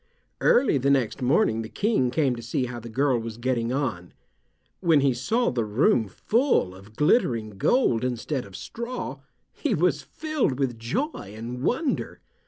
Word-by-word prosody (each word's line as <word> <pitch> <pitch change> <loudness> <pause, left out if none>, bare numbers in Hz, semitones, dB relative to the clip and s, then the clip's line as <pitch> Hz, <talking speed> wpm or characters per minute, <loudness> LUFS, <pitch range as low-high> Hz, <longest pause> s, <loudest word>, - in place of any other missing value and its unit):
Early 245 - +4
the 135 +2 +1
next 135 -2 +1
morning 125 - +2
the 110 - -7
King 205 - +1
came 135 -1 +1
to 120 - -7
see 120 +2 -1
how 120 -1 -6
the 115 +1 -9
girl 130 +1 +1
was 115 -1 -6
getting 120 -1 -1
on. 115 -11 -2 0.7
When 165 -5 +4
he 135 -2 +3
saw 225 - 0
the 120 -2 0
room 110 +1 +2
full 225 - +1
of 100 +3 -15
glittering 120 - +2
gold 115 - +2
instead 125 +2 -2
of 100 -2 -12
straw 235 - -5 0.3
he - - -1
was - - +2
filled 310 - -2
with 130 -4 -1
joy 120 - -3
and 120 +3 -6
wonder. 265 - -1
125 Hz, 165 wpm, -25 LUFS, 115-160 Hz, 0.7 s, Early